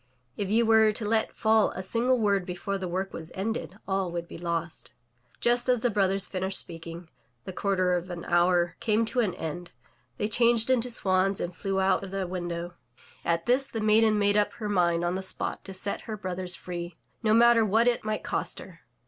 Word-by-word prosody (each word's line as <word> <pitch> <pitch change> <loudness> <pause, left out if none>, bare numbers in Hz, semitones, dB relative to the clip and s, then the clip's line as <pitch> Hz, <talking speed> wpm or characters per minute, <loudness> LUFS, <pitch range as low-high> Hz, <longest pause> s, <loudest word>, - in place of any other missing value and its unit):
If 200 -2 -3
you 230 +3 +3
were 220 -1 +5
to 215 +1 -3
let 220 0 0
fall 220 -1 +3
a 185 - -5
single 240 +6 +1
word 200 -4 +1
before 180 +2 -4
the 185 - -3
work 190 +2 -3
was 160 0 -8
ended, 200 -1 -3
all 190 -2 -1
would 170 0 -4
be - - -9
lost/' 170 -1 -3 0.5
Just 240 +1 +1
as 245 -2 +3
the 245 - +1
brothers 195 -1 +1
finished 190 0 0
speaking, 165 0 -6 0.4
the 190 - -6
quarter 185 -2 +1
of 180 +1 -2
an 175 -1 -6
hour 175 0 +2
came 220 0 +1
to 245 +3 0
an 210 -7 +1
end, 170 +2 -6 0.5
they 210 - -1
changed 235 +2 +3
into 250 -1 +2
swans 190 -3 +2
and 175 0 -4
flew 195 +1 -2
out 190 +1 +2
of 195 - -6
the 195 0 -3
window. 175 -1 -4 0.5
At 170 0 0
this> 260 +3 +2
the 225 - -5
maiden 215 0 +4
made 205 0 +3
up 210 - +1
her 215 - -5
mind 175 -3 +2
on 175 - 0
the 190 - -2
spot 190 - -3
to 195 - -6
set 200 +2 -2
her 220 -2 -6
brothers 185 -2 -4
free, 175 -2 -6 0.2
no 220 -1 +3
matter 235 0 +6
what 220 +3 +3
it 240 -1 +1
might 215 0 -2
cost - - -3
her. - - -11
195 Hz, 210 wpm, -27 LUFS, 180-220 Hz, 0.5 s, matter